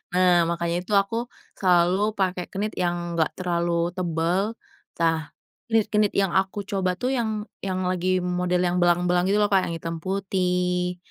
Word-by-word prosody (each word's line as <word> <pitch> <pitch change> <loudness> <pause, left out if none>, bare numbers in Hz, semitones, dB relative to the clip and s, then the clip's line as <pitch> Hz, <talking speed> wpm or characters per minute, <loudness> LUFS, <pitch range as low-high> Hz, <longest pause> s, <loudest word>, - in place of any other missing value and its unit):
nah 180 -2 +4
makanya 170 0 -1
itu 210 - -5
aku 225 +5 0 0.3
selalu 185 +3 +3
pakai 185 -2 -1
knit 210 +2 -3
yang 175 -1 -1
enggak 160 - +2
terlalu 170 -1 0
tebel. 180 +4 -1 0.4
Tah 165 -1 0 0.4
knit-knit 215 -2 +2
yang 195 -3 +2
aku 195 +1 0
coba 185 -2 -1
tuh 255 +4 -1
yang 220 -4 -1 0.2
yang 185 -1 -2
lagi 185 0 +1
model 180 0 0
yang 180 0 0
belang-belang 175 +1 +3
gitu 205 - +3
loh 205 - +3
Kak, 190 - +4
yang - - -3
hitam 165 0 -5
putih, 180 -2 -1
180 Hz, 155 wpm, -24 LUFS, 175-195 Hz, 0.4 s, nah